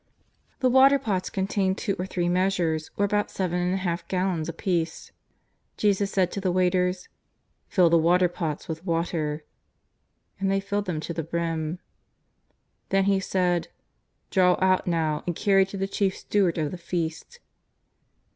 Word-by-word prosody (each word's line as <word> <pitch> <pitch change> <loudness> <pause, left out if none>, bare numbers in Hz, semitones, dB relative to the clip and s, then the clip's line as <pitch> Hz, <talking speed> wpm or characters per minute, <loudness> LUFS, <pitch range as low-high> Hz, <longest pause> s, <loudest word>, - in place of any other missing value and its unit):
The 260 - +4
water 270 +2 +6
pots 200 -8 -2
contained 190 0 0
two 200 -3 -1
or 185 - -2
three 175 -2 -1
measures, 175 -3 0
or 205 - +3
about 205 +1 0
seven 180 -2 -2
and 180 +1 0
a - - 0
half 175 -2 -3
gallons 180 -4 -1
apiece. 170 -1 -2 0.7
Jesus 200 -1 +2
said 185 -3 +1
to 200 - -4
the 185 -2 +1
waiters: 180 0 +1 0.3
" - - -47
Fill 175 -4 +4
the 170 - +5
water 180 +3 +4
pots 165 -4 -4
with 160 +1 -5
water." 165 -3 -2 1.0
And 195 0 0
they 195 0 +2
filled 200 +1 -2
them 165 -5 -3
to 170 - -5
the 165 - -2
brim. 165 0 -2 1.1
Then 195 0 +3
He 195 0 +2
said: 180 -3 0 0.3
" - - -48
Draw 180 -1 +4
out 185 -1 +2
now 160 -3 0
and 175 - -1
carry 195 -1 +3
to 195 - -7
the 195 0 -1
chief 195 -1 -1
steward 190 -5 +1
of 155 -2 -1
the 180 - -7
feast." 170 - -4
180 Hz, 165 wpm, -26 LUFS, 170-195 Hz, 1.1 s, water